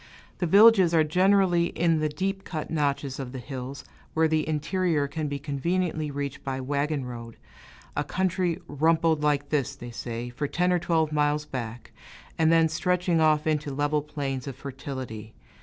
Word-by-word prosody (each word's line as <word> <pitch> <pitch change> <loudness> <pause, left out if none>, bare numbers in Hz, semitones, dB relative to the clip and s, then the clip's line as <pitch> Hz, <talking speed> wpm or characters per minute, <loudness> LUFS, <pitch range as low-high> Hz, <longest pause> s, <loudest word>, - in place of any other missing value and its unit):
The 175 - 0
villages 195 -2 +7
are 160 - +5
generally 180 +1 +3
in 165 -2 +1
the 155 0 0
deep 195 +5 -3
cut 155 -4 -5
notches 140 -3 -1
of 130 -2 -6
the - - -5
hills, 130 +1 -7 0.3
where 160 0 +4
the 155 0 0
interior 155 -1 0
can 155 +2 -3
be 145 0 -3
conveniently 155 +3 -1
reached 140 -1 -5
by 135 -1 -2
a 130 - -5
wagon 140 +1 -1
road 115 -2 -8 0.6
a 145 - 0
country 180 +1 0
"rumpled 160 +1 +2
like 145 -1 +1
this," 140 -2 0
they 120 -3 -9
say, 120 +1 -5
for 140 +4 -3
ten 180 +4 +1
or 180 - +2
twelve 160 -2 +1
miles 150 0 +1
back, 120 -4 -6 0.4
and 160 0 +3
then 165 -1 +5
stretching 175 +1 +1
off 155 -1 +3
into 150 -2 0
level 145 +2 0
plains 140 -3 -4
of 135 - -5
fertility. 130 -5 -7
150 Hz, 175 wpm, -26 LUFS, 140-165 Hz, 0.6 s, villages